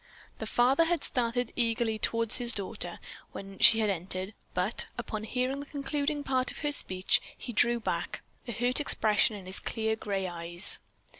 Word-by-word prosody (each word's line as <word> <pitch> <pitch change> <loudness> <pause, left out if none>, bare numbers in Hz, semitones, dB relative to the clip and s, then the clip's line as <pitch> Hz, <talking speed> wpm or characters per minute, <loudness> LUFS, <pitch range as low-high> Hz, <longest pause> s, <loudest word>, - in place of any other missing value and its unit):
The - - -4
father 265 +7 +3
had 335 -2 0
started 245 -1 -1
eagerly 230 -2 0
toward 230 0 0
his 240 -2 +3
daughter 200 -2 -2 0.3
when 195 0 -9
she 225 -1 +7
had 210 -2 +2
entered, 185 +2 -3 0.2
but, 185 +6 0
upon 220 -2 -5
hearing 255 +4 -2
the 285 - -8
concluding 290 +1 -2
part 260 -2 0
of - - -6
her 295 - +1
speech, 185 -9 +2 0.2
he 240 - -7
drew 235 +2 +3
back, - - -3 0.2
a - - -3
hurt 245 +4 0
expression 215 -5 +1
in 195 -3 -10
his 185 +2 -2
clear 220 -1 -2
gray 195 -3 -3
eyes. 175 +1 +5
230 Hz, 170 wpm, -29 LUFS, 200-255 Hz, 0.3 s, she